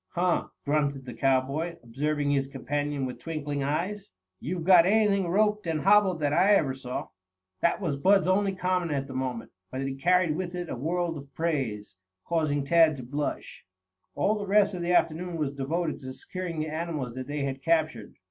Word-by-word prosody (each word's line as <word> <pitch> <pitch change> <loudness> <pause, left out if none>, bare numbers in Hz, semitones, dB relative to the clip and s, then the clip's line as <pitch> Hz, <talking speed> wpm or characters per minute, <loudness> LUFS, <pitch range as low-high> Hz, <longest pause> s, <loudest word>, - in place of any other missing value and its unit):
"Huh!" 180 0 +1 0.2
grunted 145 -2 0
the 125 - -7
cowboy, 135 +7 0
observing 145 +4 -1
his 135 -1 +1
companion 145 +1 -2
with 125 - -6
twinkling 145 -3 -4
eyes. 175 +9 -2 0.3
"You've 170 +4 -4
got 180 -1 +7
anything 200 -2 +3
roped 210 +2 +1
and 160 -2 -1
hobbled 195 -3 +4
that 145 -1 +1
I 200 +6 +5
ever 140 -8 +2
saw." 130 -1 -5 0.5
That 170 - +2
was 160 -8 -2
Bud's 195 +6 +4
only 195 +1 +2
comment 180 -2 0
at 140 -2 -1
the 135 - -9
moment, 130 -3 -3 0.2
but 130 - -4
it 135 0 -2
carried 180 -2 +3
with 180 0 -4
it 175 -1 -4
a - - -2
world 165 +4 -2
of 140 0 -13
praise, 130 - -2 0.3
causing 155 -4 0
Tad 165 +1 +5
to 130 - -8
blush. 145 +4 -4 0.5
All 210 - +2
the 205 - -5
rest 205 +1 +4
of 180 - -4
the 175 +1 -1
afternoon 175 0 +1
was 145 -3 -1
devoted 155 +4 -2
to 130 -2 -7
securing 180 +2 -6
the 155 - -1
animals 155 -6 -3
that 130 0 -6
they 145 0 -2
had 135 -1 -3
captured. 155 -8 0
155 Hz, 185 wpm, -27 LUFS, 140-180 Hz, 0.5 s, got